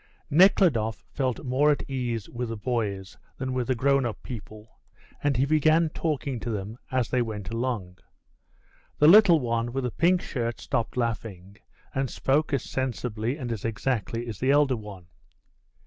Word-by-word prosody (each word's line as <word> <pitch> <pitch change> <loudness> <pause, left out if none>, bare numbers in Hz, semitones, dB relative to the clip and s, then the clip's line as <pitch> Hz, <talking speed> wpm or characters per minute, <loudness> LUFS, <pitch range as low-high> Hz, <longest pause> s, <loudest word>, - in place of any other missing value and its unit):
Nekhludoff 145 - +4
felt 130 -1 -2
more 130 +4 +3
at 145 - 0
ease 120 -5 -3
with 120 -1 -5
the 115 - -4
boys 100 -5 -3 0.2
than 130 -1 -3
with 125 -2 -1
the 130 - +1
grown 140 +2 +2
up 120 -3 -4
people, 110 -2 -10 0.4
and 145 -3 +2
he 130 - +3
began 155 +2 +3
talking 140 -6 -2
to 120 - -5
them 105 +2 -4
as 130 -3 0
they 125 - +1
went 105 -4 -4
along. 115 -7 -3 1.0
The 150 - +5
little 185 -2 +8
one 115 -2 -1
with 135 +1 -2
the 125 - -1
pink 180 +1 +2
shirt 120 -3 -3
stopped 115 +1 -2
laughing, 110 -5 -3 0.4
and 135 -1 -1
spoke 150 +4 0
as 140 - 0
sensibly 125 -1 -3
and 125 -5 -5
as 110 -4 -4
exactly 115 0 -2
as 110 -4 -6
the 130 - 0
elder 140 -2 +4
one. 105 -5 -9
125 Hz, 165 wpm, -26 LUFS, 110-140 Hz, 1.0 s, little